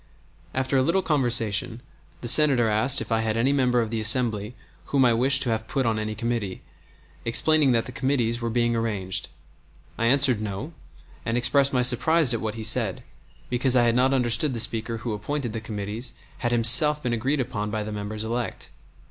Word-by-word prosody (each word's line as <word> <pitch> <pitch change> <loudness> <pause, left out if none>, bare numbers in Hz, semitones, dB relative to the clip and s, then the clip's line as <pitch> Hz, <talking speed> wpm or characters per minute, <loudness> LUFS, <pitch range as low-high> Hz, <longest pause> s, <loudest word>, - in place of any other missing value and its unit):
After 130 +1 -1
a - - +3
little 170 +8 0
conversation 120 -6 -1 0.4
the 120 - -6
Senator 130 -3 +6
asked 110 +6 +3
if - - -8
I 110 - +1
had 110 0 -2
any 130 +5 +1
member 125 -3 +1
of 110 -1 -5
the 115 -1 -3
Assembly 110 -1 +3 0.3
whom 135 -2 +1
I 120 - +3
wished 130 +4 +2
to 120 - -2
have 110 0 -3
put 135 +1 -2
on 110 -1 -1
any 110 0 -5
committee, 115 -4 -4 0.6
explaining 145 +4 +3
that 115 -1 0
the - - -8
committees 125 -3 -2
were 115 - -3
being 120 0 0
arranged. 105 -5 -3 0.7
I 115 - 0
answered 130 -3 +3
no, 110 - -6 0.5
and 115 +1 -2
expressed 140 +3 +2
my 125 -2 0
surprise 130 +3 +2
at 115 - -3
what 110 -1 -4
he 115 - -7
had - - -4
said, 110 -4 -1 0.4
because 125 +1 0
I 120 - +4
had 120 -1 +2
not 130 +2 +2
understood 125 +1 0
the - - -4
Speaker 115 +1 -2
who 115 0 -5
appointed 120 +3 -5
the 115 - -5
committees 110 +3 -6 0.3
had 120 - -2
himself 130 +6 +6
been 125 -1 -2
agreed 130 +6 -2
upon 115 -5 -4
by 105 0 -4
the 105 - -7
members 105 +1 -6
elect. 115 +1 -5
120 Hz, 200 wpm, -23 LUFS, 110-130 Hz, 0.7 s, Senator